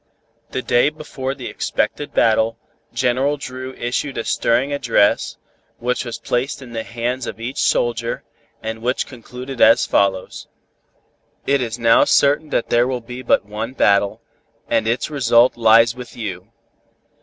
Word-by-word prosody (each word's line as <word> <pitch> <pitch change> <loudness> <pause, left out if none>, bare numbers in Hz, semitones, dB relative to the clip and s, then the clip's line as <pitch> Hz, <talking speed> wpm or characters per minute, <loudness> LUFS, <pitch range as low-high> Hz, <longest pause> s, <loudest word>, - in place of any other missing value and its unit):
The 130 - -4
day 120 +3 +3
before 140 -3 -5
the - - -9
expected 145 - -2
battle, 110 0 +2 0.3
General 130 +3 +1
Dru 130 -1 -7
issued 125 +3 -2
a 115 - -1
stirring 125 +5 +1
address, 120 -7 +1 0.4
which 125 +2 -2
was 120 -1 -5
placed 130 +4 -2
in 130 -3 -11
the 115 - -2
hands 120 +2 -3
of - - -6
each 120 +4 -5
soldier, 115 -1 0 0.4
and 110 0 -4
which 125 +2 0
concluded 125 +1 -8
as 115 - +6
follows: 95 -2 0 1.0
"It 140 -1 +2
is 115 -2 -3
now 115 -1 +5
certain 145 +2 +3
that 120 - -1
there 120 +1 +4
will 130 -1 -2
be 125 +2 -8
but 120 - +2
one 110 +4 -5
battle, 100 -5 +2 0.4
and 110 - +1
its 120 +5 -1
result 120 -3 +4
lies 115 0 +5
with 125 -1 -11
you. 100 -2 -6
120 Hz, 150 wpm, -20 LUFS, 115-130 Hz, 1.0 s, as